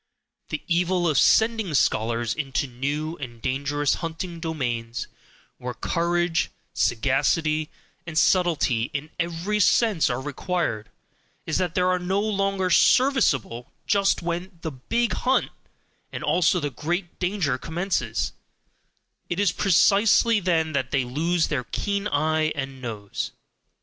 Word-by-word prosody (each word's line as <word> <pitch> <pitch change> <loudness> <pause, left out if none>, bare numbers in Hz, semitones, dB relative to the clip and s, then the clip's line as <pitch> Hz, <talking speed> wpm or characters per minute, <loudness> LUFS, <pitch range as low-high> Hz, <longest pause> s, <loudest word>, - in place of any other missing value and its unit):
The 155 - -4
evil 175 0 +1
of 150 -5 +3
sending 220 -7 +3
scholars 115 -2 +1
into 140 -2 -2
new 145 +6 -3
and 120 -4 -8
dangerous 140 +3 0
hunting 165 +1 -5
domains, 120 -8 -3 0.5
where 125 0 -5
courage, 175 -1 0 0.2
sagacity, 150 +6 +1 0.4
and 160 -2 -5
subtlety 160 -10 +2
in 150 +2 -4
every 175 +5 -1
sense 205 -2 +3
are 125 - -1
required, 145 - -2 0.6
is 160 - -1
that 180 -3 -1
they 180 - +2
are 180 0 +2
no 185 +3 0
longer 195 -3 0
serviceable 150 - +3
just 200 -3 +2
when 175 +2 -4
the 160 - -4
"BIG 230 - -1
hunt," 260 +1 +1 0.6
and - - -6
also 180 0 +3
the 145 -3 -3
great 175 +6 -3
danger 180 -8 0
commences, 175 +6 -2 1.0
it - - -2
is 205 -4 +3
precisely 205 +4 +4
then 165 -4 +1
that 130 -4 -1
they 135 -2 +1
lose 160 +7 0
their 125 -5 -2
keen 200 +6 -2
eye 155 -1 +1
and 135 -2 -5
nose. 105 -5 -5
160 Hz, 130 wpm, -24 LUFS, 135-185 Hz, 1.0 s, precisely